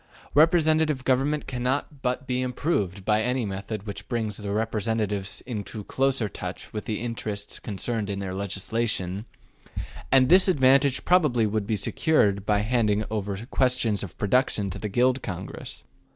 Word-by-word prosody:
Representative 155 -3 +4
government 135 +3 +1
cannot 130 +3 -2
but 125 +1 -1
be 125 -1 -1
improved 105 - -1
by 105 0 +3
any 125 +1 0
method 100 +1 -5
which 100 -2 -7
brings 110 -4 -2
the 105 -1 -5
representatives 105 -2 -1
into 110 -3 -5
closer 135 -1 0
touch - - -7
with 105 - -4
the 110 -3 -2
interests 110 -3 -4
concerned 105 +1 -3
in 100 - -2
their 95 -1 -4
legislation; 100 0 -2 0.9
and 130 -1 +6
this 185 +5 +6
advantage 135 -4 +4
probably 150 -11 +4
would 105 -1 -1
be 110 - +1
secured 100 - +1
by 105 -1 +3
handing 110 -2 +1
over 105 0 -3
questions 125 -5 +2
of 95 -5 -7
production 105 -2 +1
to - - -6
the 105 - -3
Guild 125 +5 +2
Congress. 90 -3 -7
110 Hz, 150 wpm, -26 LUFS, 100-130 Hz, 0.9 s, and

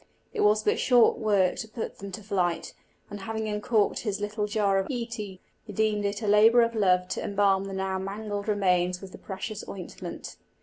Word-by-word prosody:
It - - -1
was 210 +1 +4
but - - +1
short 245 -3 +4
work 200 -4 +2
to 220 - -5
put 220 +1 -6
them 200 0 -7
to 210 - -7
flight; 180 -4 -1 0.4
and 205 - -6
having 220 +2 -3
uncorked 210 0 +1
his 205 -3 -2
little 210 +1 -2
jar 205 -2 +2
of 195 - -2
íce, 235 -3 -4
he 200 -4 -7 0.3
deemed 210 0 +1
it 200 +2 -2
a - - -1
labour 220 +3 +6
of 230 0 0
love 180 -4 +3
to - - -3
embalm 200 -1 +2
the 195 - -6
now 190 0 -2
mangled 205 +1 -4
remains 180 -3 +2
with 195 -1 -10
the - - -11
precious 205 +2 -6
ointment. 185 -3 -8
205 Hz, 200 wpm, -27 LUFS, 195-215 Hz, 0.4 s, labour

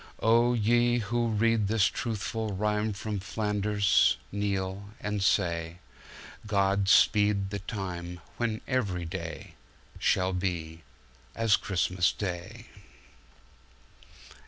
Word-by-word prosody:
Oh 120 +2 +4
ye 120 +2 +3
who 120 +1 -1
read 110 -1 +2
this 105 -1 +3
truthful 110 -1 -2
rimeFrom 105 -1 -1
Flanders, 105 -1 +2
kneel 100 -1 -2
and 105 -1 -2
say:God 95 +4 -1
speed 105 -1 +4
the 100 - -3
time 90 -4 -6 0.2
when 115 -2 -1
every 100 -10 -1
dayShall 90 +2 -3
be 85 -3 -3 0.5
as 115 -2 +3
Christmas 90 -1 0
Day. 90 -4 -5
100 Hz, 85 wpm, -28 LUFS, 95-110 Hz, 0.5 s, Oh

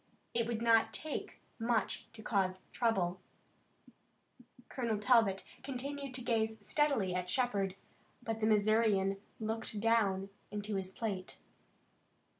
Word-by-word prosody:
It 230 -1 +1
would 230 -1 -2
not 225 -1 +5
take 310 +4 -5 0.2
much 230 0 0
to 220 -1 -10
cause 190 -4 +1
trouble." 185 -6 +1 1.5
Colonel 235 -4 -1
Talbot 210 -3 +4 0.2
continued 275 0 -4
to 250 - -4
gaze 220 -2 +1
steadily 275 -12 +2
at 180 0 -2
Shepard, 200 -6 +1 0.5
but 225 -1 -2
the 215 - +2
Missourian 210 -2 +3 0.2
looked 220 -1 -3
down 205 -4 +2 0.2
into 210 0 -3
his 190 -1 -2
plate. 195 -3 -4
220 Hz, 115 wpm, -34 LUFS, 195-235 Hz, 1.5 s, not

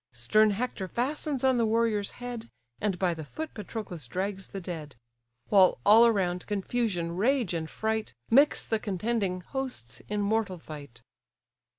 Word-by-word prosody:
Stern 215 - +4
Hector 205 -2 -2
fastens 270 - -2
on 260 -1 +4
the 230 - +3
warrior's 220 -2 +1
head, 245 -2 -6 0.3
And 205 -3 0
by 180 -1 +1
the 160 -1 -6
foot 315 - -6
Patroclus 195 - -6
drags 195 +4 -3
the 195 - -6
dead: 160 -6 -7 0.5
While 190 -3 +6
all 225 +3 +8
around, 180 -5 0
confusion, 200 -4 -1
rage, 235 0 +2
and 160 -1 -3
fright, 220 0 -2 0.2
Mix 280 +5 +5
the 220 - 0
contending 200 -2 -1
hosts 215 - -5
in 210 0 -1
mortal 205 -2 0
fight. 145 -7 -10
205 Hz, 150 wpm, -29 LUFS, 180-230 Hz, 0.5 s, all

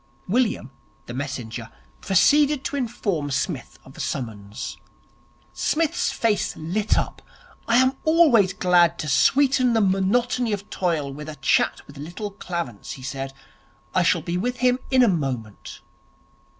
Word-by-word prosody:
William, 210 - 0 0.3
the 120 - -7
messenger, 125 -4 -5 0.3
proceeded 285 - +4
to 285 - -3
inform 205 - -2
Psmith 135 -2 -3
of 135 - -14
the - - -14
summons. 110 -7 -5 0.8
Psmith's 320 -1 0
face 220 -3 0
lit 190 +7 0
up. - - -2 0.5
'I 230 +1 +4
am 260 +1 +4
always 300 - +5
glad 175 -3 +3
to 155 - -4
sweeten 255 - +3
the 225 - +3
monotony 220 +4 +1
of 205 0 -4
toil 160 -7 -1
with 150 +2 -8
a 155 - -7
chat 135 - +1
with 145 - -14
Little 180 +8 -6
Clarence,' 175 -4 -5
he 130 - -11
said. 135 0 -4 0.6
'I - - +3
shall - - +3
be 170 +1 -2
with 245 +5 -2
him 250 +1 +2
in 260 -1 +5
a - - +5
moment.' 130 - -3
185 Hz, 145 wpm, -23 LUFS, -, 0.8 s, always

